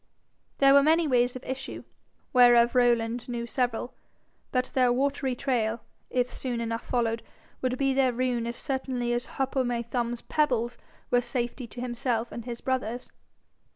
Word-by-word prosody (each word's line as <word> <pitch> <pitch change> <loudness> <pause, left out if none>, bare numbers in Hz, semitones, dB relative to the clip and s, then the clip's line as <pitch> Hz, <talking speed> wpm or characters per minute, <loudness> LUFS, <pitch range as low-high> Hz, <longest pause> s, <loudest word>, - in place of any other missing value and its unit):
There 275 0 +6
were 280 - +8
many 320 +3 +4
ways 245 -2 +2
of 255 - -7
issue, 265 +1 -5 0.5
whereof 240 -1 +6
Rowland 240 -1 +2
knew 235 -1 -3
several; 245 0 -1 0.6
but 255 -1 0
their 250 -2 +4
watery 265 0 0
trail, 235 -4 0 0.3
if 250 0 0
soon 245 -3 -3
enough 230 0 -3
followed, 230 -2 0 0.4
would 255 0 0
be 270 0 +2
their 265 -1 +3
ruin 245 -1 -1
as 235 - -4
certainly 260 -3 -2
as 240 +1 -2
Hop 270 +1 -1
o' 265 - +3
my 240 -1 -1
Thumb's 235 0 -2
pebbles 245 -6 +1 0.4
were 245 - +4
safety 245 0 -3
to 240 - -8
himself 240 -1 -2
and 235 - -7
his 235 -1 -6
brothers. 250 -2 -2
245 Hz, 160 wpm, -27 LUFS, 235-260 Hz, 0.6 s, were